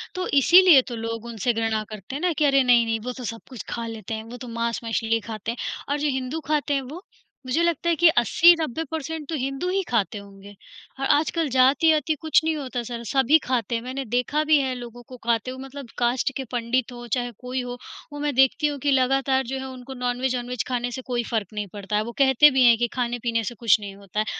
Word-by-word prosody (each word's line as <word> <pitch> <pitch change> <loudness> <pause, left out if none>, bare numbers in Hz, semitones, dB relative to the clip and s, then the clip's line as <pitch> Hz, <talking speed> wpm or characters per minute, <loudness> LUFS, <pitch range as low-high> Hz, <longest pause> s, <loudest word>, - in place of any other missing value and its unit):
तो 365 0 -2
इसीलिए 350 0 +7
तो 240 - -5
लोग 230 0 -5
उनसे 235 0 -1
घृणा 225 -1 -1
करते 215 +4 -8
हैं 290 - -4
ना 360 -1 +1
कि 305 -1 +1
अरे! 275 -1 +4
नहीं-नहीं, 235 -2 +3
वो 245 +3 -5
तो 255 - -7
सब 230 0 -5
कुछ 245 -7 -8
खा 235 -1 -4
लेते 225 -1 -7
हैं, 220 0 -4
वो 235 +2 -10
तो 250 - -9
मांस-मछली 230 -1 -1
खाते 220 0 -4
हैं। 235 - -8 0.3
और 285 - +1
जो 300 - 0
हिंदू 260 +5 -4
खाते 300 -1 0
हैं, 275 - +1
वो? 300 +8 -9 0.4
मुझे 255 +6 0
लगता 340 0 0
है 340 - +3
कि 345 +2 +5
80-90 320 +4 +4
परसेंट 320 -1 -5
तो 325 - -2
हिंदू 275 +6 -3
ही 390 +1 +1
खाते 220 -2 0
होंगे। 200 0 -12 0.5
अ, - - -3
आजकल 310 +3 +1
जाति-वाति 290 +5 +3
कुछ 315 -1 +3
नहीं 320 0 0
होता 260 -4 -4
सर, 235 0 -6
सभी 270 +5 +4
खाते 245 -2 -1
हैं, 230 - -2
मैंने 260 +3 -5
देखा 250 +6 0
भी 310 0 +4
है 265 -2 -1
लोगों 245 -1 -9
को 255 - -10
खाते 235 +1 0
हुए, 260 - -9
मतलब 270 -2 -9
कास्ट 245 +2 +1
के 270 - -3
पंडित 245 +1 -1
हों, 240 0 -9
चाहे 245 -1 -1
कोई 255 +1 -3
हो। 245 0 -6 0.4
वो 290 - -6
मैं 295 0 -1
देखती 275 +3 +3
हूँ 290 -1 -3
कि 285 +2 0
लगातार 265 0 +2
जो 265 +2 -3
है 265 - -6
वो 260 - -8
उनको 255 +1 -9
नॉनवेज 250 0 -1
ऑनवेज 245 -1 -3
खाने 245 -1 -2
से 260 - -5
कोई 240 -1 0
फ़र्क 220 -4 -1
नहीं 210 -1 -4
पड़ता 205 0 -4
है। 210 - +2
वो 235 - -6
कहते 275 +1 +6
भी 260 -1 +3
हैं 235 -2 +6
कि 240 +1 +1
खाने-पीने 235 -2 -1
से 240 +3 -5
कुछ 220 -1 +3
नहीं 200 -2 -8
होता 200 +1 -6
है, 215 - +1
250 Hz, 240 wpm, -24 LUFS, 230-280 Hz, 0.5 s, इसीलिए